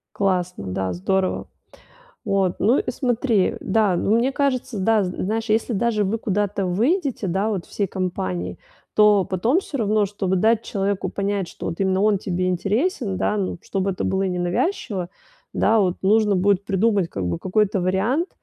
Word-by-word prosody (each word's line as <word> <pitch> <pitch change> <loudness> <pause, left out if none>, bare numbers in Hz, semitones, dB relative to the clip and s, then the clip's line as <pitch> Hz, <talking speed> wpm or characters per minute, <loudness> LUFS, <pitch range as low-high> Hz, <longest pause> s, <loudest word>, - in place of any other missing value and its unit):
Классно. 180 - -1
Да, 95 0 -2
здорово. 185 - -1 0.8
Вот, 195 -4 +1
ну 235 +7 +3
и - - -3
смотри, 240 -5 +1
да, 205 -2 +2
ну, 200 +5 +1
мне 255 +3 +1
кажется, 260 -5 -1
да, 215 +1 +3
з 180 - -2
знаешь, 220 +3 -1
если 225 +2 +1
даже 215 0 +1
вы 205 +4 0
куда-то 205 -2 -1
выйдете, 245 - 0
да, 195 +5 0
вот 195 -5 -3
всей 200 - -1
компанией, 95 - -3 0.4
то 210 -3 +5
потом 225 - +1
всё 310 -7 -6
равно, 215 -2 +2
чтобы 190 -2 -2
дать 220 +4 +2
человеку 195 -1 -2
понять, 200 -2 -2
что - - -7
вот 165 - -5
именно 190 0 +1
он 210 -1 +3
тебе 185 -1 -2
интересен, 205 - -1
да, 210 - 0
ну, 185 -3 -2
чтобы 195 0 -2
это 185 - -4
было 190 0 0
ненавязчиво, 180 - -1 0.4
да, 225 0 +3
вот 185 -2 +1
нужно 210 +1 +3
будет 195 +1 +2
придумать, 195 -2 +1
как 95 - -4
бы, 85 -1 -1
какой-то 200 0 +1
вариант. 205 - 0
200 Hz, 170 wpm, -22 LUFS, 185-220 Hz, 0.8 s, то